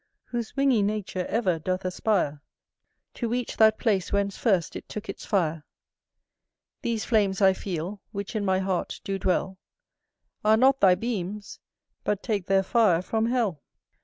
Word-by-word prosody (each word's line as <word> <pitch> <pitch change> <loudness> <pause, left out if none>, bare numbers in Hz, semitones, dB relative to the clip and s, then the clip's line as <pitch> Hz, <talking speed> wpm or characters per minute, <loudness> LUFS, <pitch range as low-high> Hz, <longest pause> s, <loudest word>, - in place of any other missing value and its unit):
Whose 235 -1 -4
wingy 275 -5 +3
nature 200 -3 -2
ever 190 -7 0
doth 185 +3 -2
aspire 180 -6 0 0.7
To 235 - -3
reach 245 +1 -2
that 220 0 +5
place 200 -6 0
whence 200 -1 0
first 190 -9 +1
it - - -8
took 210 +1 -6
its - - -7
fire. 165 -6 0 1.2
These 225 -2 -2
flames 205 -4 +2
I 190 -2 +6
feel, 185 +1 -5
which 200 +1 -5
in 215 - 0
my 190 -1 +2
heart 190 -1 -2
do 195 -1 -3
dwell, 190 +1 0 0.8
Are 215 +1 +5
not 265 +3 +4
thy 185 -2 +6
beams, 210 -2 -4 0.4
but 205 -1 -1
take 205 -6 -2
their 195 0 +3
fire 195 -6 +3
from 220 +4 0
hell. 225 - 0
200 Hz, 155 wpm, -26 LUFS, 185-220 Hz, 1.2 s, I